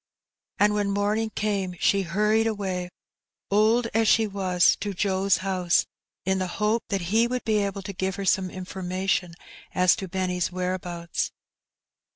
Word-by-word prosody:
And 210 +1 +4
when 205 -1 0
morning 205 +2 0
came 200 -4 -2
she 200 - +3
hurried 210 +5 +2
away, 190 -4 -2 0.6
old 220 +4 +4
as 225 0 +2
she 225 +1 +5
was, 190 -3 +2
to 205 -2 -4
Joe's 195 0 +2
house, 180 -3 +2 0.4
in 190 0 +1
the 185 - -1
hope 215 +2 +1
that 195 -2 -1
he 230 +2 +4
would 250 0 -3
be 215 -1 +2
able 200 -1 -2
to 200 - -6
give 190 0 -2
her 200 - -4
some 190 -1 +2
information 185 -1 -2 0.4
as 180 -1 +5
to 195 - -5
Benny's 185 -1 -1
whereabouts. 180 -2 -3
195 Hz, 155 wpm, -25 LUFS, 185-210 Hz, 0.6 s, she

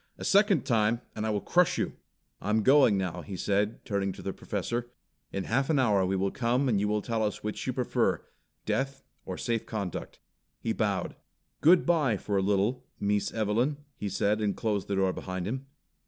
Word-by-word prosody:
"A - - -6
second 200 - +4
time 115 0 +2
and 110 0 -2
I - - 0
will 105 -1 0
crush 180 -1 +3
you! - - -1 0.5
I'm 110 +1 +1
going 130 -6 +6
now," 95 -3 -2
he 95 -3 -7
said, 100 +3 0
turning 100 -2 -1
to - - -11
the 95 - -3
Professor. 120 +4 -3 0.4
"In 95 - -2
half 135 +8 0
an 155 - +3
hour 105 -8 +3
we 95 - 0
will 95 +1 0
come 125 +3 +1
and 110 -6 +2
you 105 - +1
will 105 0 0
tell 115 -2 -1
us 105 - -2
which 105 0 -4
you - - 0
prefer - - 0 0.4
death 135 0 -1 0.2
or - - -4
safe 115 -2 -2
conduct." 100 -6 -4 0.4
He 115 - -1
bowed. 100 -5 -1 0.5
"Good 175 +4 +6
bye 150 -11 +3
for 100 +1 -3
a 95 - +3
little, 100 +5 +1 0.2
Mees 105 0 0
Evelyn, 115 +6 +1 0.2
he 105 - -4
said 100 +2 +1
and 105 -2 0
closed 105 -3 -1
the 100 - -1
door 95 -1 +2
behind 95 -1 -4
him." 130 +5 -4
105 Hz, 200 wpm, -29 LUFS, 100-125 Hz, 0.5 s, going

